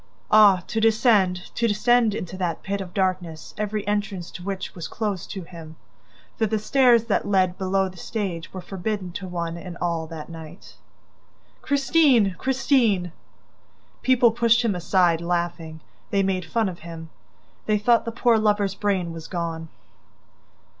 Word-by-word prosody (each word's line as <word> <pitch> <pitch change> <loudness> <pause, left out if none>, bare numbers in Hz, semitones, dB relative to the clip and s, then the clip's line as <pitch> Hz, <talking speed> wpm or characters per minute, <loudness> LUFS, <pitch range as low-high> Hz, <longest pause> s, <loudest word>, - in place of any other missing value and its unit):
Ah, 205 -4 +6
to 225 - -2
descend, 215 -5 +2
to 235 - +1
descend 230 0 +3
into 185 -2 -5
that 180 -3 -3
pit 200 +1 -3
of 185 -2 -7
darkness 180 -4 -2
every 210 0 -3
entrance 205 -4 -2
to - - -9
which 195 +1 -5
was 170 - -6
closed 205 -5 -4
to 190 -3 -6
him,... 165 -2 -11 0.6
for 220 - +1
the 220 +1 0
stairs 240 +1 +4
that 230 -3 -1
led 185 -3 +2
below 190 0 0
the 185 -1 -11
stage 185 -6 -4
were 185 - -7
forbidden 195 0 -4
to 185 +2 -6
one 170 -1 -4
and 170 0 -8
all 170 -2 -2
that 160 -1 -8
night! 165 +1 -11 0.9
"Christine! 275 - +3
Christine! 245 - +1 0.5
..." - - -36
People 250 -2 +4
pushed 235 +1 +3
him 220 - +2
aside, 175 -1 +2
laughing. 170 -2 -3 0.3
They 195 -1 +1
made 185 -2 -1
fun 225 +5 0
of 180 -2 -6
him. 165 -1 -9 0.6
They 215 -1 +3
thought 230 +3 +3
the 230 - -4
poor 235 0 +3
lover's 205 -2 +1
brain 195 -4 -1
was 165 -1 -8
gone! 165 -2 -4
190 Hz, 160 wpm, -24 LUFS, 175-220 Hz, 0.9 s, Ah